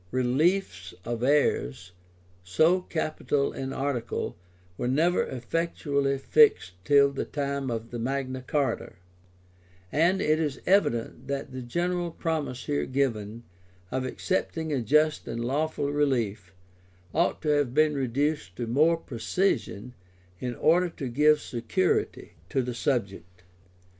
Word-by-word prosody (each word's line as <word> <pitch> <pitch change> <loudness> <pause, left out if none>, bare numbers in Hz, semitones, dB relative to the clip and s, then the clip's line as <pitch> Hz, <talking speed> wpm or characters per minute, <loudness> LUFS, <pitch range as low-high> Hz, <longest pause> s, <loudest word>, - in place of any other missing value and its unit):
Reliefs 130 - 0
of 120 0 -3
heirs, 95 - +1 0.5
so 160 - +3
capital 155 -4 -1
an 135 0 -4
article, 135 -4 -2 0.4
were 120 - -3
never 160 +8 +2
effectually 140 +1 -1
fixed 420 - +4
till 140 +5 +5
the 140 - -3
time 140 -2 -3
of 115 0 -5
Magna 130 +2 -3
Charta;[*] 140 -6 -1 1.0
and 170 +6 +3
it 155 +1 +2
is 150 -5 -2
evident 130 - +1
that 140 -1 -3
the 130 0 -6
general 175 +7 -1
promise 155 -7 -3
here 145 -1 -1
given, 115 -5 -1 0.5
of 130 0 -1
accepting 160 +2 -2
a 135 - 0
just 150 +6 +2
and 115 0 -3
lawful 145 +2 -1
relief, 115 -11 0 0.6
ought 170 +3 +1
to 155 - 0
have 145 -4 +1
been 155 0 +4
reduced 140 +3 -1
to 120 - -3
more 155 +8 +3
precision, 125 - -2 0.5
in 125 -1 -3
order 175 +6 +3
to 140 -5 -6
give 150 +4 +4
security 115 -8 -1 0.2
to 135 - 0
the 125 0 -4
subject. 95 - -3
140 Hz, 125 wpm, -27 LUFS, 120-155 Hz, 1.0 s, till